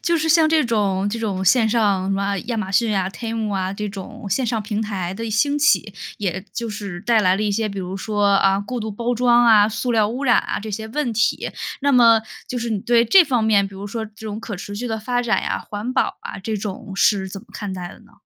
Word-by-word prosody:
就 340 -1 +1
是 320 0 -1
像 320 -1 +5
这 315 -2 +3
种 200 -4 0
这 230 - -3
种 200 -4 -2
线 220 +4 +4
上 205 -4 +1
什 - - 0
么 200 0 -1
亚 235 - -2
马 195 -3 -3
逊 220 0 +2
啊 190 -1 0
，TEMU 225 -1 -4
啊， 190 -1 -1
这 210 +1 -4
种 205 +3 -9
线 245 +6 +1
上 220 -1 -1
平 210 0 -3
台 195 -5 -3
的 230 +3 -5
兴 285 +7 +1
起， 280 -7 +2 0.2
也 190 -2 -3
就 235 -2 -3
是 200 -4 -6
带 225 +2 +3
来 185 -1 +3
了 210 - -2
一 210 -1 0
些 220 +1 0
比 200 -1 -6
如 185 0 -5
说， 205 0 0
啊， 195 0 +3
过 240 +4 -4
度 220 0 -4
包 235 +4 -2
装 240 0 +4
啊、 215 -3 +6
塑 240 +3 -2
料 215 -2 +3
污 255 +5 -4
染 245 - +5
啊， - - -2
这 215 +1 -7
些 220 +2 -5
问 250 0 -2
题。 220 0 0 0.3
那 285 0 +2
么， 230 -3 +6 0.3
就 250 - -3
是 235 0 -3
你 215 - 0
对 235 +2 +3
这 365 - +7
方 250 -7 0
面， 205 -3 +3
比 195 - -14
如 200 +1 -7
说 220 +2 -4
这 215 - -19
种 215 0 -5
可 215 -2 -6
持 205 +3 -7
续 245 +4 -4
的 220 -1 -2
发 245 +3 -1
展 240 -2 0
呀、 - - -1
环 210 +4 -4
保 - - 0
啊， - - -7
这 215 +3 -3
种 205 +1 -6
是 195 -2 +2
怎 195 - -7
么 - - -21
看 200 -2 -5
待 180 -1 -6
的 - - -13
呢？ - - -21
215 Hz, 290 characters per minute, -21 LUFS, 200-235 Hz, 0.3 s, 这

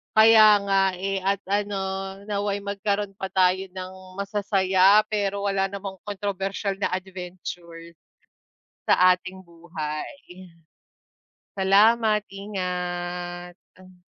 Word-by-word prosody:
Kaya 220 -1 +7
nga, 195 0 +2 0.2
eh, 195 0 -2
at 195 0 +1
ano 205 0 -1 0.5
nawa'y 205 -1 -1
magkaroon 200 0 -3
pa 190 -1 -6
tayo 185 0 +3
ng 185 0 -7 0.3
masasaya 200 0 +3
pero 200 -1 -1
wala 195 -1 0
namang 200 -1 -6
kontrobersyal 195 -1 -3
na 195 - -2
adventure 180 -2 -7 0.9
sa 185 0 +6
ating 185 +1 -4
buhay. 170 - -8 1.1
Salamat. 210 +2 +3
Ingat. 180 -1 -6
195 Hz, 95 wpm, -24 LUFS, 180-200 Hz, 1.1 s, Kaya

